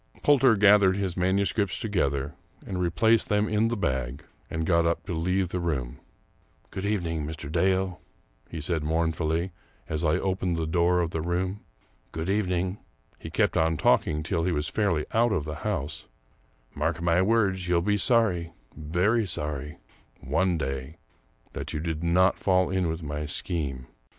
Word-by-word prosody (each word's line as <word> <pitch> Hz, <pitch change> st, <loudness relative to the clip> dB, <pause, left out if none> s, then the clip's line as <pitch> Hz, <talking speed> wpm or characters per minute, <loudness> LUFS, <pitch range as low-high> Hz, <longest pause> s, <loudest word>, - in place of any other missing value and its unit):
Poulter 135 Hz, -5 st, +5 dB
gathered 100 Hz, -1 st, +5 dB
his 95 Hz, -3 st, -2 dB
manuscripts 95 Hz, +2 st, 0 dB
together 70 Hz, -, -1 dB, 0.3 s
and 90 Hz, -1 st, -3 dB
replaced 110 Hz, +6 st, +2 dB
them 105 Hz, 0 st, +2 dB
in 110 Hz, +1 st, +2 dB
the 120 Hz, 0 st, -2 dB
bag, 65 Hz, -7 st, -2 dB, 0.3 s
and 80 Hz, 0 st, -2 dB
got 85 Hz, 0 st, +3 dB
up 85 Hz, 0 st, -1 dB
to -, -, -4 dB
leave 90 Hz, +3 st, 0 dB
the 90 Hz, -, -2 dB
room. 70 Hz, -8 st, -3 dB, 0.4 s
" -, -, -37 dB
Good 95 Hz, +1 st, -3 dB
evening, 85 Hz, -7 st, -1 dB
Mr. 75 Hz, -2 st, -6 dB
Dale," 95 Hz, +2 st, +1 dB, 0.5 s
he 80 Hz, -, -6 dB
said 80 Hz, 0 st, -1 dB
mournfully, 80 Hz, +2 st, 0 dB, 0.4 s
as 75 Hz, +1 st, -2 dB
I 80 Hz, -1 st, +2 dB
opened 95 Hz, -3 st, -1 dB
the 80 Hz, -, -1 dB
door 85 Hz, +2 st, +2 dB
of 85 Hz, -1 st, -2 dB
the 80 Hz, -, -2 dB
room. 90 Hz, +4 st, -2 dB, 0.3 s
" -, -, -38 dB
Good 80 Hz, +4 st, -2 dB
evening 95 Hz, -1 st, -1 dB
" -, -, -40 dB
— -, -, -35 dB
he -, -, -8 dB
kept -, -, +1 dB
on 80 Hz, 0 st, +2 dB
talking 75 Hz, 0 st, +2 dB
till 85 Hz, -1 st, -1 dB
he 90 Hz, -, +1 dB
was 75 Hz, -2 st, -1 dB
fairly 90 Hz, -8 st, 0 dB
out 115 Hz, +1 st, +3 dB
of 90 Hz, -8 st, 0 dB
the 75 Hz, -1 st, -5 dB
house 75 Hz, +4 st, -3 dB, 0.2 s
— -, -, -37 dB
" -, -, -38 dB
mark 80 Hz, -1 st, -1 dB
my 85 Hz, +1 st, +2 dB
words, 95 Hz, -3 st, +1 dB
you'll 85 Hz, -1 st, +2 dB
be 105 Hz, +2 st, +2 dB
sorry 100 Hz, -7 st, +2 dB, 0.2 s
— -, -, -30 dB
very 90 Hz, +9 st, +1 dB
sorry 75 Hz, -2 st, -4 dB, 0.3 s
— -, -, -36 dB, 0.2 s
one 95 Hz, -2 st, +2 dB
day 70 Hz, +1 st, -4 dB, 0.6 s
that -, -, -5 dB
you 75 Hz, -, -2 dB
did 80 Hz, 0 st, -3 dB
not 90 Hz, +3 st, +3 dB
fall 95 Hz, -1 st, +2 dB
in 95 Hz, -3 st, 0 dB
with 80 Hz, +1 st, -4 dB
my 75 Hz, 0 st, -4 dB
scheme. 70 Hz, -6 st, -4 dB
85 Hz, 185 wpm, -27 LUFS, 80-95 Hz, 0.6 s, Poulter